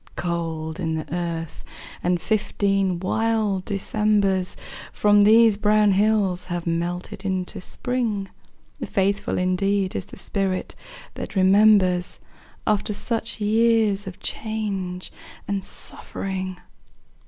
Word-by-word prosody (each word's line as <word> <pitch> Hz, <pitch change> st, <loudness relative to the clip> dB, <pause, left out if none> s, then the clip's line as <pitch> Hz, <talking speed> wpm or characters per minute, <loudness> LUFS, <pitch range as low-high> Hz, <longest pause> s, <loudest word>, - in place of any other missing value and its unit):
Cold 165 Hz, -2 st, -3 dB
in 160 Hz, -3 st, -1 dB
the 155 Hz, 0 st, -5 dB
earth, 165 Hz, -2 st, -4 dB, 0.4 s
and 175 Hz, 0 st, +1 dB
fifteen 195 Hz, -2 st, 0 dB
wild 210 Hz, 0 st, 0 dB
Decembers 200 Hz, -2 st, +1 dB, 0.3 s
From 205 Hz, 0 st, +4 dB
these 220 Hz, 0 st, +6 dB
brown 210 Hz, 0 st, +4 dB
hills 195 Hz, -3 st, +2 dB
have 175 Hz, -2 st, -4 dB
melted 175 Hz, +3 st, -3 dB
into 185 Hz, -2 st, -3 dB
Spring. 225 Hz, -2 st, -2 dB, 0.6 s
Faithful 200 Hz, 0 st, 0 dB
indeed 190 Hz, +1 st, +1 dB
is -, -, -3 dB
the -, -, -13 dB
spirit 195 Hz, -2 st, -2 dB, 0.4 s
that -, -, -7 dB
remembers 190 Hz, -2 st, +4 dB, 0.5 s
After 210 Hz, 0 st, +1 dB
such 225 Hz, +1 st, -1 dB
years 215 Hz, -2 st, +2 dB
of 185 Hz, -, -8 dB
change 195 Hz, -5 st, -3 dB, 0.4 s
and 200 Hz, -1 st, -1 dB
suffering! 185 Hz, -1 st, -5 dB
195 Hz, 105 wpm, -23 LUFS, 180-210 Hz, 0.6 s, these